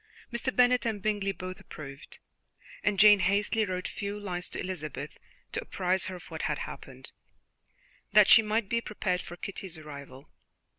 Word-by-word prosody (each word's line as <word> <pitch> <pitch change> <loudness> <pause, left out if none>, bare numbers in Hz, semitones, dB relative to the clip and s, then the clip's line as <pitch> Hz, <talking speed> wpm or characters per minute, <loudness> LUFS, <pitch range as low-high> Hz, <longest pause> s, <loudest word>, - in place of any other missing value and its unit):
Mr. 240 +2 -1
Bennet 250 0 +5
and 220 -3 -1
Bingley 205 -1 0
both 185 -1 -7
approved, 140 -2 -10 0.7
and 205 -1 +2
Jane 210 -1 +9
hastily 205 +3 +2
wrote 185 -1 -3
a - - -8
few 205 +1 -4
lines 180 -3 -3
to - - -6
Elizabeth 175 -5 -5 0.3
to - - -2
apprise 185 - 0
her 190 - -5
of 180 - -12
what - - -4
had - - 0
happened, - - -8 1.0
that 210 -2 +7
she 225 - +9
might 215 0 0
be 230 +3 0
prepared 190 -5 -1
for 175 - -9
Kitty's 185 -1 -5
arrival. 140 -3 -10
195 Hz, 165 wpm, -29 LUFS, 180-215 Hz, 1.0 s, Jane